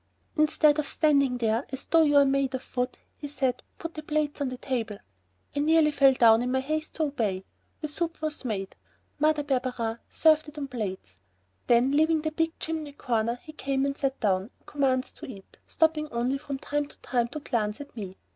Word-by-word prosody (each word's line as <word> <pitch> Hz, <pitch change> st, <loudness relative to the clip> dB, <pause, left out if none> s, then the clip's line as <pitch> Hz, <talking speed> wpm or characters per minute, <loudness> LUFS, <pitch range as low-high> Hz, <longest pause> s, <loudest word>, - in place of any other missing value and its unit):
"Instead 305 Hz, -1 st, +4 dB
of 295 Hz, -, -1 dB
standing 280 Hz, -5 st, +2 dB
there 230 Hz, +1 st, +1 dB
as 265 Hz, 0 st, -5 dB
though 330 Hz, -, +4 dB
you're 290 Hz, -2 st, +5 dB
made 270 Hz, -1 st, +1 dB
of 255 Hz, -, -9 dB
wood," 250 Hz, 0 st, -1 dB, 0.2 s
he 295 Hz, -, -6 dB
said, 265 Hz, -3 st, -1 dB, 0.2 s
"put 330 Hz, 0 st, -6 dB
the 310 Hz, -, -6 dB
plates 300 Hz, -1 st, -1 dB
on 275 Hz, -, 0 dB
the 255 Hz, -, -6 dB
table." 230 Hz, -5 st, -3 dB, 0.6 s
I -, -, 0 dB
nearly 310 Hz, +1 st, +4 dB
fell 275 Hz, -2 st, +5 dB
down 225 Hz, -2 st, +6 dB
in 250 Hz, +1 st, -1 dB
my 260 Hz, -, +2 dB
haste 310 Hz, +3 st, -3 dB
to 320 Hz, -, 0 dB
obey. 215 Hz, -10 st, -1 dB, 0.4 s
The 305 Hz, -, -2 dB
soup 330 Hz, +3 st, -3 dB
was 310 Hz, -2 st, -3 dB
made. 200 Hz, -6 st, -3 dB, 0.4 s
Mother 305 Hz, 0 st, +3 dB
Barberin 250 Hz, -4 st, -1 dB
served 310 Hz, -1 st, +4 dB
it 300 Hz, -, -15 dB
on 290 Hz, -, -3 dB
the 275 Hz, -, -5 dB
plates. 190 Hz, -, -5 dB, 0.5 s
Then, 240 Hz, +3 st, +4 dB
leaving 315 Hz, +1 st, +3 dB
the 315 Hz, -, -1 dB
big 325 Hz, +1 st, -1 dB
chimney 315 Hz, -3 st, -4 dB
corner, 235 Hz, -3 st, 0 dB
he 310 Hz, -, -11 dB
came 275 Hz, -2 st, -1 dB
and 280 Hz, 0 st, -1 dB
sat 275 Hz, -1 st, -2 dB
down 195 Hz, 0 st, +1 dB
and -, -, -35 dB
commenced 265 Hz, -3 st, 0 dB
to 320 Hz, -, -8 dB
eat, 200 Hz, -7 st, -12 dB
stopping 315 Hz, -1 st, +1 dB
only 245 Hz, +4 st, 0 dB
from 280 Hz, -2 st, -5 dB
time 290 Hz, +1 st, -2 dB
to -, -, -14 dB
time 240 Hz, -2 st, 0 dB
to 275 Hz, +6 st, -6 dB
glance 215 Hz, -7 st, -2 dB
at 285 Hz, -3 st, -10 dB
me. 195 Hz, -4 st, -7 dB
275 Hz, 205 wpm, -27 LUFS, 240-305 Hz, 0.6 s, down